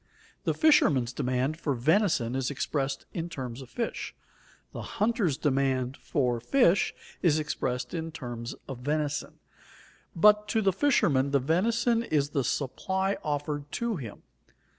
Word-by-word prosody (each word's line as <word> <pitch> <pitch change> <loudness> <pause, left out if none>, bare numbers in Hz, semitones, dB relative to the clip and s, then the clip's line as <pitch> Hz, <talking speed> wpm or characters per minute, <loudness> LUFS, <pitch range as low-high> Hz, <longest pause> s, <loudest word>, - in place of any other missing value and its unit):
The - - +1
fisherman's 140 - +4
demand 130 +4 -1
for 145 -5 -1
venison 145 - +2
is 130 -1 0
expressed 135 -1 -2
in 170 0 -3
terms 130 -5 -6
of 130 - -11
fish; 235 - -4 0.6
the - - -6 0.2
hunter's 210 - +1
demand 135 -2 0
for 125 -7 -1
fish 200 - +3 0.3
is 160 -4 +4
expressed 125 -4 -2
in 165 -1 -3
terms 120 -5 -6
of 130 -3 -6
venison. 145 +2 -2 0.8
But 210 +4 +5
to 220 0 +1
the 195 -1 +3
fisherman 160 - +3
the 140 0 +3
venison 230 - +2
is 150 -9 0
the 140 - 0
supply 190 +10 -1
offered 145 -1 -3
to 235 -4 -1
him. 115 -8 -8
145 Hz, 140 wpm, -28 LUFS, 130-190 Hz, 0.8 s, But